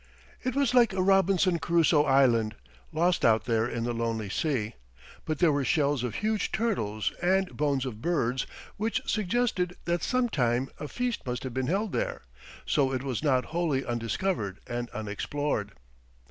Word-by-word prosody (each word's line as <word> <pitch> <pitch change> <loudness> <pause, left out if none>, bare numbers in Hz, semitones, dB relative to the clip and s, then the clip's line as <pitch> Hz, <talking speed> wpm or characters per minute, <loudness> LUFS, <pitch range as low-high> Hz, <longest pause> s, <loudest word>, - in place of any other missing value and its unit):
It 255 0 -1
was 275 -3 +2
like 240 -5 +5
a 190 - 0
Robinson 190 -2 +3
Crusoe 165 -3 +3
island, 120 -6 +3 0.4
lost 175 +3 +1
out 110 -2 +4
there 115 -1 +1
in 115 -1 -3
the 120 0 -1
lonely 115 -3 -2
sea. 115 -3 -1 0.5
But 155 -1 -1
there 170 0 +4
were 145 -1 +1
shells 145 -3 +1
of 120 -4 -3
huge 215 0 -1
turtles, 110 - -1
and 190 +1 +1
bones 140 -3 0
of 110 -4 -6
birds, 130 -6 0 0.3
which 220 +2 -1
suggested 210 -4 0
that 175 -1 0
sometime 135 - +1
a 150 - -4
feast 245 +6 -2
must 125 0 -3
have 130 -2 -5
been 130 0 -1
held 200 +5 0
there, - - -2 0.4
so 135 -3 +2
it 130 -1 -2
was 130 -4 -2
not 130 -5 +2
wholly 160 -6 0
undiscovered 115 - -2
and 120 0 -4
unexplored. 110 +1 -3
145 Hz, 160 wpm, -28 LUFS, 120-185 Hz, 0.5 s, like